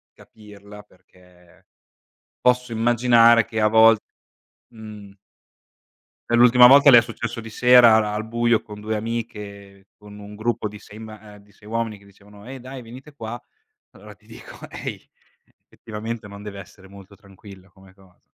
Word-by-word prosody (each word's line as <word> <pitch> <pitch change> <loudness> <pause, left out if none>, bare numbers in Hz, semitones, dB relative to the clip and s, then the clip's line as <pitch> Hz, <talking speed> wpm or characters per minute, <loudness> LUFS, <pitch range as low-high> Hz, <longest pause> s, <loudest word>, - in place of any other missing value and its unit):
capirla 105 -1 -16
perché 90 -2 -26 0.8
posso 125 -1 0
immaginare 115 0 +3
che 110 -1 -4
a 110 - +3
volte, 110 0 +4 0.7
mhmm 105 -2 -12 1.2
e - - +1
l'ultima 125 +1 +6
volta 140 +2 +6
le 120 - +8
è - - +3
successo 115 0 -7
di 110 - -11
sera 115 -3 +4
al 110 +1 -5
buio 120 0 0
con 105 -1 -12
2 110 +1 -4
amiche 105 -3 -8
con 105 0 -15
un 105 +1 -12
gruppo 110 0 -3
di 105 0 -12
6 105 +1 -15
ma 110 -1 -13
e 100 - -19
di 100 0 -26
6 105 - -19
uomini 115 -2 -4
che 100 - -23
dicevano: 100 +2 -19
"Ehi 135 0 -9
dai 130 0 -10
venite 130 +6 -14
qua", 115 -1 -8 0.5
allora - - -15
ti - - -30
dico: - - -14
"Ehi, - - -8 0.6
effettivamente 110 0 -9
non 100 0 -12
deve 100 -1 -9
essere 95 +1 -17
molto 100 0 -16
tranquillo 100 -1 -17
come 95 -1 -21
cosa." 95 -2 -25
110 Hz, 160 wpm, -21 LUFS, 100-115 Hz, 1.2 s, le